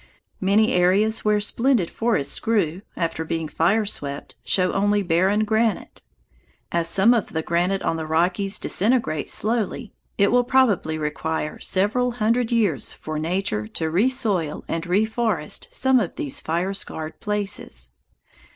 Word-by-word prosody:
Many 210 Hz, +5 st, +3 dB
areas 195 Hz, +5 st, +2 dB
where 210 Hz, -1 st, +3 dB
splendid 230 Hz, -2 st, +1 dB
forests 225 Hz, -12 st, 0 dB
grew, 195 Hz, -6 st, 0 dB, 0.2 s
after 165 Hz, -2 st, -2 dB
being 160 Hz, 0 st, -3 dB
fire 195 Hz, +8 st, +1 dB
swept, 140 Hz, -8 st, -5 dB
show 185 Hz, -1 st, +1 dB
only 205 Hz, +1 st, +2 dB
barren 190 Hz, +5 st, +2 dB
granite. 220 Hz, -1 st, -1 dB, 0.7 s
As 170 Hz, -1 st, +1 dB
some 195 Hz, +7 st, +5 dB
of 230 Hz, -4 st, -1 dB
the 160 Hz, 0 st, -1 dB
granite 175 Hz, +4 st, 0 dB
on 165 Hz, -, 0 dB
the 160 Hz, -1 st, -4 dB
Rockies 180 Hz, +5 st, +1 dB
disintegrates 210 Hz, -, 0 dB
slowly, 225 Hz, 0 st, -1 dB, 0.2 s
it 200 Hz, -, +3 dB
will 245 Hz, +1 st, +4 dB
probably 235 Hz, -11 st, +2 dB
require 155 Hz, 0 st, -3 dB
several 230 Hz, +6 st, 0 dB
hundred 235 Hz, +1 st, +1 dB
years 205 Hz, -, 0 dB
for 155 Hz, -1 st, -5 dB
Nature 160 Hz, -, -2 dB
to 160 Hz, +7 st, -3 dB
resoil 195 Hz, -, 0 dB
and 165 Hz, +1 st, -3 dB
reforest 210 Hz, -2 st, -1 dB
some 265 Hz, -1 st, +3 dB
of 195 Hz, -8 st, -3 dB
these 140 Hz, -, -3 dB
fire 175 Hz, +4 st, -1 dB
scarred 160 Hz, -5 st, -5 dB
places. 200 Hz, -, -3 dB
195 Hz, 140 wpm, -23 LUFS, 165-220 Hz, 0.7 s, some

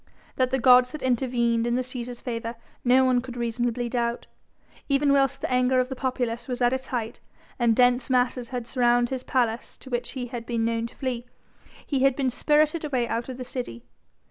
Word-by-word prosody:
That 255 Hz, -1 st, +1 dB
the 265 Hz, -, +1 dB
gods 250 Hz, 0 st, +6 dB
had 305 Hz, -, -6 dB
intervened 240 Hz, -2 st, +1 dB
in 240 Hz, -, +1 dB
the 255 Hz, -, 0 dB
Cæsar's 245 Hz, -1 st, -6 dB
favour 230 Hz, -1 st, -4 dB, 0.3 s
no 260 Hz, +1 st, +5 dB
one 250 Hz, -1 st, +3 dB
could 245 Hz, 0 st, -8 dB
reasonably 240 Hz, 0 st, -1 dB
doubt. 235 Hz, 0 st, -2 dB, 0.6 s
Even 280 Hz, 0 st, +3 dB
whilst 275 Hz, 0 st, +2 dB
the -, -, -3 dB
anger 255 Hz, +1 st, +3 dB
of 255 Hz, 0 st, 0 dB
the 265 Hz, -, -4 dB
populace 245 Hz, -2 st, -2 dB
was 250 Hz, -2 st, -3 dB
at 245 Hz, 0 st, +3 dB
its 260 Hz, 0 st, -3 dB
height 230 Hz, -3 st, -4 dB, 0.4 s
and 235 Hz, -2 st, +3 dB
dense 250 Hz, +1 st, +3 dB
masses 250 Hz, -1 st, +1 dB
had 245 Hz, -2 st, -4 dB
surrounded 240 Hz, -1 st, +2 dB
his 260 Hz, -1 st, -2 dB
palace 240 Hz, -3 st, -1 dB
to 260 Hz, -, -13 dB
which 240 Hz, 0 st, -2 dB
he 255 Hz, -3 st, -4 dB
had 235 Hz, -2 st, -7 dB
been 230 Hz, -2 st, 0 dB
known 230 Hz, 0 st, -1 dB
to -, -, -19 dB
flee, 250 Hz, -2 st, -3 dB, 0.6 s
he 275 Hz, -, -1 dB
had 270 Hz, 0 st, +4 dB
been 265 Hz, -2 st, 0 dB
spirited 305 Hz, +4 st, +2 dB
away 260 Hz, -5 st, 0 dB
out 230 Hz, +2 st, -3 dB
of 255 Hz, -, -6 dB
the 255 Hz, -, -5 dB
city. 240 Hz, -, -6 dB
250 Hz, 205 wpm, -25 LUFS, 235-260 Hz, 0.6 s, gods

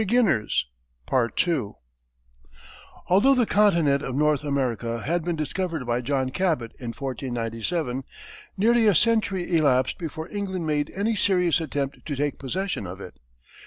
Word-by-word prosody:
Although 205 Hz, +10 st, +4 dB
the 245 Hz, -2 st, +3 dB
continent 170 Hz, -9 st, +3 dB
of 130 Hz, -3 st, -4 dB
North 150 Hz, 0 st, +2 dB
America 120 Hz, -5 st, -1 dB
had 170 Hz, +2 st, 0 dB
been 175 Hz, 0 st, -1 dB
discovered 160 Hz, -1 st, -3 dB
by 120 Hz, +1 st, 0 dB
John 130 Hz, 0 st, -1 dB
Cabot 155 Hz, -9 st, 0 dB
in 120 Hz, -, -7 dB
1497, 125 Hz, +2 st, -3 dB, 0.6 s
nearly 230 Hz, +3 st, +4 dB
a 205 Hz, -, +5 dB
century 195 Hz, -4 st, +2 dB
elapsed 130 Hz, -5 st, +2 dB
before 160 Hz, -1 st, -5 dB
England 190 Hz, -4 st, -3 dB
made 150 Hz, -1 st, 0 dB
any 215 Hz, +3 st, 0 dB
serious 180 Hz, -4 st, +2 dB
attempt 140 Hz, -3 st, -3 dB
to 145 Hz, -, -2 dB
take 145 Hz, +1 st, -2 dB
possession 175 Hz, -, -3 dB
of 90 Hz, +2 st, -8 dB
it. 90 Hz, -, -10 dB
150 Hz, 125 wpm, -25 LUFS, 130-185 Hz, 0.6 s, a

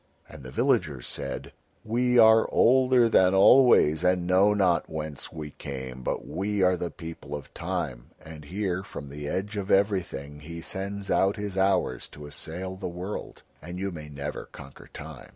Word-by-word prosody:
And 80 Hz, -, -12 dB
the 65 Hz, -, -9 dB
villagers 65 Hz, 0 st, 0 dB
said: -, -, -5 dB, 0.3 s
"We 125 Hz, +2 st, +1 dB
are 110 Hz, -1 st, +6 dB
older 125 Hz, -1 st, +5 dB
than 95 Hz, -4 st, +4 dB
always, 95 Hz, -, +6 dB
and 90 Hz, -1 st, +2 dB
know 95 Hz, +3 st, +4 dB
not 95 Hz, -4 st, +2 dB
whence 75 Hz, -2 st, -5 dB
we 75 Hz, -2 st, -7 dB
came, 65 Hz, -3 st, -7 dB
but -, -, -3 dB
we 100 Hz, +1 st, -1 dB
are 90 Hz, 0 st, +4 dB
the 85 Hz, -1 st, -3 dB
people 80 Hz, -3 st, -8 dB
of 70 Hz, -2 st, -9 dB
Time, -, -, -4 dB
and 80 Hz, -2 st, -11 dB
here 95 Hz, +1 st, -2 dB
from 70 Hz, -7 st, -9 dB
the 75 Hz, +1 st, -7 dB
Edge 100 Hz, +6 st, -3 dB
of 100 Hz, -1 st, -4 dB
Everything 90 Hz, -8 st, 0 dB
he 85 Hz, +3 st, -8 dB
sends 100 Hz, +3 st, -4 dB
out 95 Hz, +1 st, +3 dB
his 105 Hz, -2 st, -5 dB
hours 95 Hz, 0 st, +1 dB
to 75 Hz, -, -11 dB
assail 90 Hz, +6 st, -5 dB
the 95 Hz, -, -5 dB
world, 90 Hz, +4 st, -7 dB, 0.2 s
and 85 Hz, +3 st, -7 dB
you 95 Hz, +1 st, -3 dB
may 75 Hz, -3 st, -8 dB
never 75 Hz, 0 st, -6 dB
conquer 70 Hz, -1 st, -12 dB
Time." -, -, -10 dB
90 Hz, 170 wpm, -27 LUFS, 75-100 Hz, 0.3 s, are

